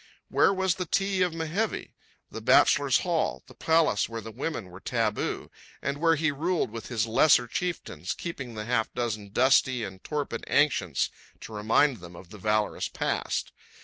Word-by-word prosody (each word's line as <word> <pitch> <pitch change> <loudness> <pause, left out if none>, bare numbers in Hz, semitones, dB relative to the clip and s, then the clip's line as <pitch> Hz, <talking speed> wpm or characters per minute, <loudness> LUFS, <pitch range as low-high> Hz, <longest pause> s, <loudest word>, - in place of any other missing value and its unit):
Where - - +4
was 190 -2 +1
the 180 -1 -5
Ti 195 +1 +1
of 180 -1 +3
Mehevi, 165 +7 -2 0.4
the - - -6
bachelors' - - +4
hall, - - -1
the - - -15
palace 160 -11 +2
where 115 0 -5
women 110 - -5
were 90 - -11
taboo, 110 -1 -2 0.3
and 140 +1 -3
where 165 0 +4
he 155 0 +1
ruled 165 -2 -1
with 115 -1 -7
his 115 -2 0
lesser 120 +3 +4
chieftains, 175 +9 -3
keeping 135 -9 -6
the 105 0 -5
half 115 -1 0
dozen 110 -4 -3
dusty 130 +1 +3
and 95 -2 -8
torpid 150 -2 -3
ancients 140 - +2 0.3
to 110 - -9
remind 115 +6 +2
them 85 -2 -12
of 85 +1 -13
the 105 - -10
valorous 105 +2 0
past? - - -2
125 Hz, 165 wpm, -27 LUFS, 110-160 Hz, 0.4 s, Where